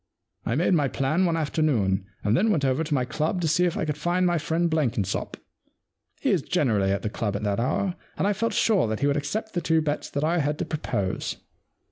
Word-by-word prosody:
I 115 Hz, -, +1 dB
made 175 Hz, +5 st, +2 dB
my 150 Hz, -5 st, +3 dB
plan 145 Hz, +8 st, +1 dB
one 165 Hz, -1 st, 0 dB
afternoon, 120 Hz, -, +1 dB, 0.2 s
and 105 Hz, +2 st, +2 dB
then 215 Hz, -, +3 dB
went 155 Hz, -10 st, +2 dB
over 130 Hz, +4 st, +1 dB
to 150 Hz, -1 st, -3 dB
my 125 Hz, -2 st, +1 dB
club 155 Hz, +8 st, -1 dB
to 165 Hz, -, +1 dB
see 180 Hz, +3 st, +3 dB
if 175 Hz, -, -1 dB
I -, -, -1 dB
could 150 Hz, -1 st, -3 dB
find 175 Hz, +3 st, +1 dB
my 175 Hz, -2 st, +2 dB
friend 165 Hz, +3 st, 0 dB
Blenkinsop. 120 Hz, -, -1 dB, 0.8 s
He -, -, +1 dB
is -, -, +2 dB
generally 105 Hz, -8 st, +1 dB
at 100 Hz, -1 st, -1 dB
the 110 Hz, -, -1 dB
club 105 Hz, -3 st, -2 dB
at 105 Hz, -, -3 dB
that 100 Hz, 0 st, 0 dB
hour, 175 Hz, +9 st, 0 dB, 0.2 s
and -, -, 0 dB
I 205 Hz, -, +3 dB
felt 230 Hz, +4 st, -1 dB
sure 205 Hz, -, +3 dB
that 110 Hz, +2 st, -3 dB
he -, -, +2 dB
would 145 Hz, 0 st, +2 dB
accept 210 Hz, +10 st, -3 dB
the 175 Hz, -, -1 dB
two 160 Hz, -1 st, +2 dB
bets 150 Hz, -1 st, -2 dB
that 145 Hz, -, -2 dB
I 170 Hz, +3 st, +2 dB
had 150 Hz, 0 st, 0 dB
to 175 Hz, -, -2 dB
propose. 125 Hz, -, -2 dB
150 Hz, 235 wpm, -25 LUFS, 120-170 Hz, 0.8 s, my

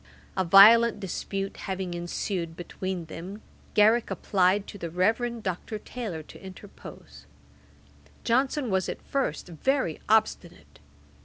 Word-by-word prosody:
A 190 Hz, -, +1 dB
violent 210 Hz, +5 st, +7 dB
dispute 195 Hz, +1 st, -4 dB
having 190 Hz, -2 st, -4 dB
ensued 175 Hz, 0 st, -4 dB
between 180 Hz, 0 st, -5 dB
them, 185 Hz, +6 st, -9 dB, 0.3 s
Garrick 220 Hz, +3 st, +4 dB
applied 195 Hz, 0 st, +1 dB
to 205 Hz, -, -10 dB
the 170 Hz, -, -5 dB
Reverend 225 Hz, +7 st, 0 dB
Dr. 185 Hz, +4 st, -4 dB
Taylor 210 Hz, -8 st, -6 dB
to -, -, -15 dB
interpose. 190 Hz, +1 st, -12 dB, 1.0 s
Johnson 260 Hz, +1 st, 0 dB
was 190 Hz, -1 st, 0 dB
at -, -, -5 dB
first 265 Hz, -, -2 dB
very 175 Hz, -, -1 dB
obstinate. 170 Hz, -, 0 dB
195 Hz, 115 wpm, -27 LUFS, 175-220 Hz, 1.0 s, violent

